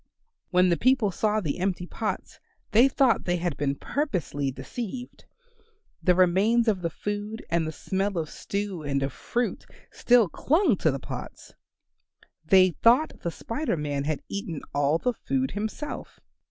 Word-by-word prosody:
When 180 0 +4
the 170 - +2
people 255 -5 +3
saw 215 +3 +1
the 155 -2 -3
empty 185 -1 -1
pots 215 +4 -4 0.3
they 235 +5 +6
thought 265 -3 +2
they 175 - +1
had 170 -3 -2
been 140 0 -1
purposely 170 - -2
deceived. 235 - -7 0.8
The 180 -2 +4
remains 195 +6 +3
of 200 -5 +2
the 170 - -1
food 205 +5 -5
and 165 -1 +1
the - - -3
smell 190 +5 -2
of 160 -2 -1
stew 200 +1 -4
and 140 -2 -1
of 135 -1 -2
fruit 240 0 -2 0.3
still 240 -4 +4
clung 310 - +2
to 160 - +2
the 135 - -1
pots. - - -8 0.9
They 185 +2 +5
thought 240 - +3
the 170 - -2
Spider 230 - -3
Man 145 -2 -2
had 155 -1 -2
eaten 180 -6 -5
all 145 +2 +2
the 250 +8 0
food 265 +2 -1
himself. 220 +8 -5
190 Hz, 155 wpm, -26 LUFS, 160-230 Hz, 0.9 s, they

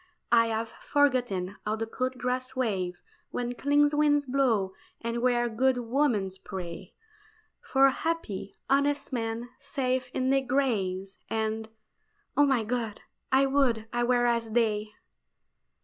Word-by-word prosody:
I 230 -1 +6
have 225 0 -2
forgotten 245 -12 0
how 210 +1 -1
the 225 +1 -2
cool 255 +3 -1
grass 255 +1 -3
waves 190 -8 -1 0.3
Where 245 0 -3
clean 290 +3 +3
winds 295 -1 +3
blow, 245 -8 +1 0.3
and 235 0 -3
where 240 -1 +2
good 255 +3 +2
women 245 -4 +1 0.2
pray 185 -1 -7 0.7
For 270 0 +4
happy, 290 - -3
honest 280 0 +1
men, 230 0 -2
safe 260 -2 -1
in 260 0 +1
their 270 0 +4
graves; 205 -8 -1
And 220 0 -2 0.7
oh, 290 0 +5
my 260 -5 +2
God! 225 -2 -3 0.3
I 265 +1 +5
would 265 -5 +2
I 240 0 +1
were 245 0 +3
as 235 -2 0
they! 215 -3 +1
240 Hz, 135 wpm, -28 LUFS, 220-265 Hz, 0.7 s, I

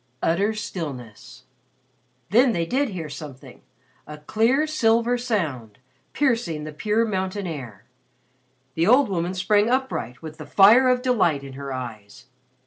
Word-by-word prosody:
Utter 200 +7 +1
stillness. 145 - -7 0.9
Then 240 +3 +4
they 170 -2 -1
did 265 +9 0
hear 175 -6 -5
something 145 -3 -10 0.5
a 150 - -8
clear 225 - +1
silver 235 -5 +2
sound, 160 - -3 0.3
piercing 230 - 0
the 155 0 -7
pure 215 +8 0
mountain 190 -1 -3
air. 135 - -7 0.9
The 165 +4 0
old 255 +2 +5
woman 180 0 -2
sprang 205 +4 +2
upright 245 - -2
with 155 0 -9
the 155 - -8
fire 215 - +6
of 250 0 +1
delight 180 - +1
in 135 -1 -9
her 140 0 -7
eyes. 115 -6 -8
185 Hz, 135 wpm, -23 LUFS, 150-230 Hz, 0.9 s, fire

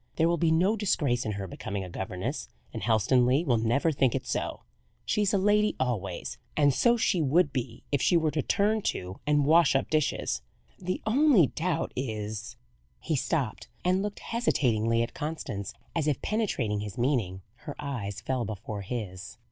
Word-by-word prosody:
There 165 - +3
will 170 0 +2
be 165 - +3
no 180 +7 +3
disgrace 145 - 0
in 110 - -1
her 100 -1 -4
becoming 95 +3 -5
a 90 - -7
governess; 95 0 -4 0.2
and - - -5
Helstonleigh 125 - +3
will 120 -6 +2
never 120 +8 +2
think 135 -4 +2
it - - -3
so. - - -3 0.4
She 210 - +1
is 205 0 +2
a 200 - +3
lady 210 +2 +3
always, 100 -8 -2 0.2
and 145 -2 +4
so 240 - +3
she 195 -6 +2
would 155 +3 +3
be 120 -3 -4
if 140 -2 +1
she 175 - +4
were 160 -2 +1
to 150 - 0
turn 215 +8 +1
to 90 - -3
and 145 -1 +3
wash 160 -1 +5
up 135 - 0
dishes. 150 - 0 0.4
The 185 0 -3
only 245 - +5
doubt 165 +4 -2
is 110 -3 -4 0.2
" 60 +1 -40
He 160 - -1
stopped, 135 -3 -1 0.2
and 185 +1 +3
looked 205 0 -4
hesitatingly 115 - +1
at 115 - -5
Constance. 145 -11 -4 0.2
As 160 -3 0
if 145 -4 +1
penetrating 140 - 0
his 105 +2 -6
meaning, 115 -8 0 0.2
her 145 - -4
eyes 105 -8 -4
fell 130 +2 -1
before 105 -1 -5
his. 100 -1 -6
135 Hz, 180 wpm, -28 LUFS, 110-170 Hz, 0.4 s, wash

